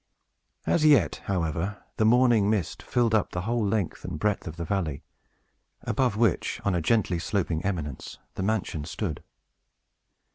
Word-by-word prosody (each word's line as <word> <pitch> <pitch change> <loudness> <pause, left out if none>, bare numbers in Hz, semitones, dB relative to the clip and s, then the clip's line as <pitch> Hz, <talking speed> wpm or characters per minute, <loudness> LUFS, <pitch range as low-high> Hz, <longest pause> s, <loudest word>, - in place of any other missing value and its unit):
As 160 - +2
yet, 145 - +4
however, 90 +1 -2
the 110 - +3
morning 120 -3 +5
mist 105 -7 -1
filled 120 -2 +1
up 110 -3 +2
the 90 - -2
whole 115 +3 0
length 100 -4 -1
and - - -4
breadth 105 +1 -1
of 80 - -6
the 85 0 -4
valley, 80 -6 -2 0.8
above 125 -6 0
which, 110 -6 +1
on 100 - +2
a 90 - +1
gently 95 -1 +2
sloping 85 -2 -1
eminence, 80 -9 -4 0.2
the - - -5
mansion 95 -6 -1
stood. 80 +1 -4
100 Hz, 150 wpm, -27 LUFS, 85-110 Hz, 0.8 s, morning